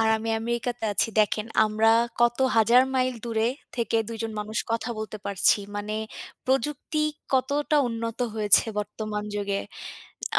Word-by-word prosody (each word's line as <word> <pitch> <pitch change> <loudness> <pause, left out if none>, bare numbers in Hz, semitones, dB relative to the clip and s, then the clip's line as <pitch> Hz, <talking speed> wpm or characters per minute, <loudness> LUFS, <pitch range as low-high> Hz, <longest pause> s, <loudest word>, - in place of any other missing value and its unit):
আর 225 - +3
আমি 225 +1 -5
আমেরিকাতে 235 0 -2
আছি। 200 - +2
দেখেন 215 +1 +2 0.2
আমরা 215 +1 +2 0.3
কত 240 +1 +3 0.2
হাজার 235 +3 +6
মাইল 255 0 +1
দূরে 225 -1 +1 0.3
থেকে 230 -1 0
২ 230 - -5
জন 225 - -3
মানুষ 210 +1 -3
কথা 230 +1 -1
বলতে 215 0 -5
পারছি। 200 +1 +3 0.2
মানে 205 +1 -4 0.5
প্রযুক্তি 285 +4 -1 0.3
কতটা 285 +3 +1
উন্নত 230 -1 -4 0.2
হয়েছে 210 -2 +5
বর্তমান 210 0 -4
যুগে। 200 -1 -1 0.8
আ - - +6
225 Hz, 145 wpm, -26 LUFS, 215-240 Hz, 0.8 s, হাজার